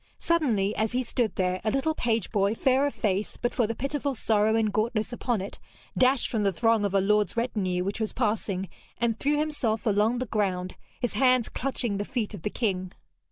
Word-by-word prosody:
Suddenly, 230 -12 +1
as 220 +1 0
he 255 +1 +1
stood 235 -2 -1
there, 185 0 0
a 215 - +1
little 275 +6 +1
page 230 -7 -1
boy, 205 0 +2
fair 265 +4 +3
of 285 - -5
face 205 -1 -1
but 240 - -1
for 235 -4 +1
the 230 - -3
pitiful 280 +1 -2
sorrow 220 -1 +2
and 220 -2 +1
gauntness 220 +1 0
upon 240 -3 -1
it, 195 - -7 0.4
dashed 260 0 +3
from 225 - -1
the 200 -1 +2
throng 225 +3 +2
of 200 -1 -1
a - - +5
lord's 210 +1 +2
retinue 195 -7 0
which 200 +3 -3
was 220 -1 -1
passing 210 -5 -1 0.3
and 230 -2 0
threw 295 +1 +1
himself 285 -8 -1
along 215 +2 +2
the 255 - -2
ground, 190 -5 -1 0.2
his 245 - -1
hands 255 +1 +3
clutching 245 -5 -1
the 205 - -1
feet 225 -1 -3
of 200 - -7
the 210 - -2
king. 185 -5 -2
220 Hz, 205 wpm, -27 LUFS, 205-250 Hz, 0.4 s, a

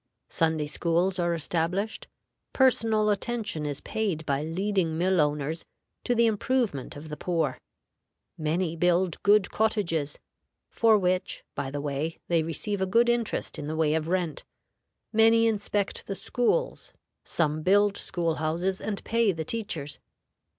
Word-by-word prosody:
Sunday 160 -2 +1
schools 175 +5 0
are 170 -1 +1
established; 175 +6 -2 0.5
personal 225 -5 +3
attention 205 -7 -2
is 145 -1 -3
paid 190 -8 -2
by 140 -2 0
leading 170 0 -1
mill 180 0 +3
owners 150 +2 -1 0.4
to 245 - +1
the 235 0 +4
improvement 225 - 0
of 150 +2 -9
the 150 - -4
poor; 165 -3 -1 0.8
many 165 +2 -1
build 175 0 +1
good 205 -1 +4
cottages 170 -9 0 0.5
(for 225 -2 +4
which, 185 -1 -1
by 140 -1 -3
the 145 +1 -4
way, 145 +3 -3
they 170 -2 +3
receive 190 +5 -2
a 190 - +1
good 235 +5 +4
interest 240 -2 -1
in 145 - -5
the 155 - -3
way 155 -1 +2
of 160 0 -1
rent); 175 -3 -1 0.7
many 225 +1 +5
inspect 205 -2 -1
the 195 - -3
schools; 250 - -1 0.3
some 155 -2 0
build 200 +3 +4
school 170 -3 -2
houses 170 +5 -1
and 210 -2 -4
pay 230 -2 +2
the 160 -3 -4
teachers. 160 -9 -3
180 Hz, 145 wpm, -27 LUFS, 160-210 Hz, 0.8 s, many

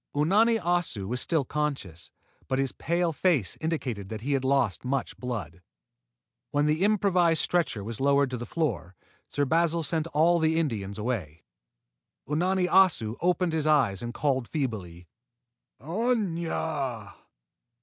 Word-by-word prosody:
Unani 210 +10 +4
Assu 175 - -1
was 125 +4 -2
still 160 -5 0
conscious, 130 - -3 0.4
but 130 - 0
his 135 -2 0
pale 170 +1 -1
face 145 - +1
indicated 130 - -3
that 110 -1 -6
he 140 +4 -1
had 135 -1 0
lost 130 -6 +1
much 135 +1 -2
blood. 100 -10 -5 0.9
When 145 0 +1
the 155 +4 +1
improvised 185 -6 +3
stretcher 165 - 0
was 115 +3 -5
lowered 140 -1 +3
to 125 - -2
the 120 0 -6
floor, 100 - -2 0.3
Sir 145 - 0
Basil 165 +2 +1
sent 160 +1 -1
all 165 +2 +3
the 160 0 +2
Indians 105 -11 -2
away. 105 - -4 0.8
Unani 180 +5 +1
Assu 175 - +3
opened 180 -1 +1
his 155 -1 0
eyes 135 -11 +3
and 120 - -4
called 130 -1 -1
feebly, 95 - -4 0.7
"Aña!" 160 - -2
145 Hz, 140 wpm, -27 LUFS, 115-170 Hz, 0.9 s, Unani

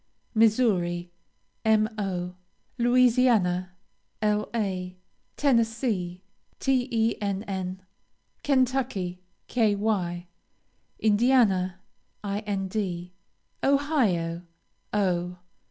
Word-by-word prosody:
Missouri, 205 -7 +2 0.5
Mo. 210 -5 0 0.4
Louisiana, 235 -7 +3 0.5
La. 210 -3 0 0.5
Tennessee, 225 -8 +1 0.4
Tenn. 205 -7 -1 0.6
Kentucky, 255 -10 0 0.3
Ky. 205 -6 0 0.7
Indiana, 205 -5 +3 0.4
Ind. 195 -3 -3 0.5
Ohio, 235 - +1 0.5
O. 180 -3 0
205 Hz, 45 wpm, -27 LUFS, 180-235 Hz, 0.7 s, Louisiana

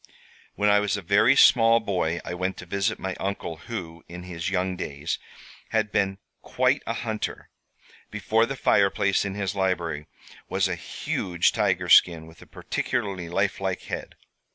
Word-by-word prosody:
"When 105 - +1
I 105 0 +5
was 105 0 0
a 100 - -7
very 105 +9 +4
small 115 -3 +6
boy 90 -6 -1
I - - -4
went 90 +1 -2
to - - -9
visit 100 +4 -1
my 95 0 -4
uncle, 95 -4 -4
who, 85 -5 -7
in 90 +1 -8
his 90 0 -4
young 95 -1 -1
days, 75 -5 -4 0.5
had 110 -1 0
been 95 -2 0 0.2
quite - - +1
a - - 0
hunter. 110 -1 -4 0.6
Before 110 +1 +1
the 135 - -4
fireplace 100 -4 +2
in 95 -1 -4
his 100 -3 -2
library 85 -6 -1 0.4
was 95 0 +1
a 90 - -2
huge 85 +1 -1
tiger - - 0
skin 85 -2 +5
with 80 +1 -16
a - - -14
particularly 95 -7 -3
lifelike 95 0 -1
head. - - -6
95 Hz, 160 wpm, -25 LUFS, 85-105 Hz, 0.6 s, small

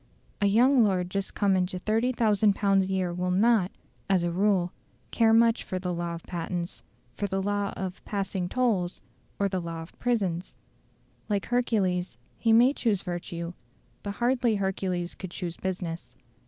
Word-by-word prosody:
A 200 - +4
young 245 +5 +5
lord 180 -3 +1
just 195 0 -3
come 200 -2 +3
into 185 0 0
30,000 215 -1 +2
pounds 195 -2 +3
a 190 - -4
year 185 -2 0
will 180 +1 -1
not, 200 0 +3 0.4
as 190 -3 +3
a 175 - 0
rule, 185 -1 +2 0.4
care 225 -1 +4
much 230 +1 +4
for 185 - -4
the 180 -1 -2
law 170 0 -3
of 165 - -9
patents, 175 0 -4 0.3
for 205 - -2
the 195 0 -1
law 205 0 -1
of 190 -1 -5
"passing 195 -3 -2
tolls," 205 -8 0 0.4
or 200 - +2
the 190 -2 -2
law 165 -1 -5
of 165 - -16
prisons. 195 -8 -1 0.7
Like 205 -2 0
Hercules, 190 - 0 0.2
he 225 - +2
may 240 +4 +6
choose 215 -8 0
virtue, 175 -1 -5 0.5
but 200 -1 -5
hardly 240 -1 +2
Hercules 190 -3 -2
could 190 - -7
choose 175 -1 -5
business. 165 -10 -5
190 Hz, 165 wpm, -27 LUFS, 180-215 Hz, 0.7 s, may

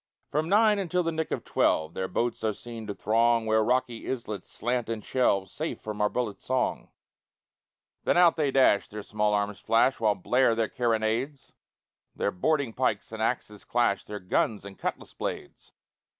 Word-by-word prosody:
From 155 +3 0
nine 210 +1 +4
until 180 -1 0
the 165 - 0
nick 160 -1 -2
of - - -3
twelve 80 +1 +1
Their 95 - -2
boats 120 +4 -2
are 110 -2 0
seen 115 -2 -8
to 100 - -4
throng 115 +2 +2
Where 110 0 +3
rocky 125 0 -1
islets 110 -6 -5
slant 120 -1 -2
and 110 -2 -4
shelve 100 -7 +1
Safe - - -4
from 105 -1 -5
our 105 - +3
bullets' 115 -4 -3
song; 130 -1 -1 1.1
Then - - +2
out 175 -2 +6
they 150 -3 +1
dash, 130 -6 +4
their 105 0 -7
small 105 0 0
arms 100 0 -1
flash, 115 +4 +2
While 110 -2 +2
blare 125 +4 +2
their 115 -1 0
carronades, 120 +4 -1 0.6
Their 100 - 0
boarding 140 - 0
pikes 110 -5 -1
and 110 -1 -5
axes 110 -3 -2
clash, 120 -5 +1
Their 105 0 -6
guns 100 +3 0
and 100 -1 -9
cutlass - - -5
blades. - - -6
115 Hz, 175 wpm, -27 LUFS, 105-130 Hz, 1.1 s, out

